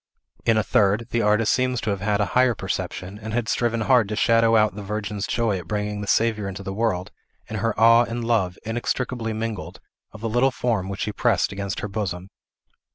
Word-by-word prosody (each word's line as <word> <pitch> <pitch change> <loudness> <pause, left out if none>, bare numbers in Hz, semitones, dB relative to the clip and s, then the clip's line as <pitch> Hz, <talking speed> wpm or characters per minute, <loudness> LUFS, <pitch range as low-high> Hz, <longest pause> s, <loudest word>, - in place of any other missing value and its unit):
In 115 -1 +4
a 110 - +2
third, 105 +3 +2
the 120 - +1
artist 105 +1 +3
seemed 130 -1 +1
to 110 - 0
have 100 -2 -3
had 100 0 +1
a 105 - +2
higher 125 -2 +4
perception, 95 0 -4
and 110 0 -6
had 120 -2 -1
striven 115 -1 0
hard 120 -3 +3
to 105 - -2
shadow 115 +1 +4
out 110 -1 +4
the 105 - -7
Virgin's 105 0 -4
joy 110 -5 0
at 85 - -11
bringing 105 0 -2
the 105 - -5
Saviour 110 -2 +1
into 100 0 -6
the 95 - -4
world, 100 -4 -1 0.4
and 110 - -4
her 115 +1 -1
awe 115 +1 +6
and 120 0 -4
love, 100 -6 +1
inextricably 120 0 -2
mingled, 110 -6 -5 0.3
of 110 - -12
the 115 - -2
little 120 +4 +3
form 115 -7 -1
which 100 - -5
she 105 - -1
pressed - - +1
against 100 0 -4
her - - -3
bosom. 95 -3 -4
110 Hz, 215 wpm, -23 LUFS, 100-115 Hz, 0.4 s, awe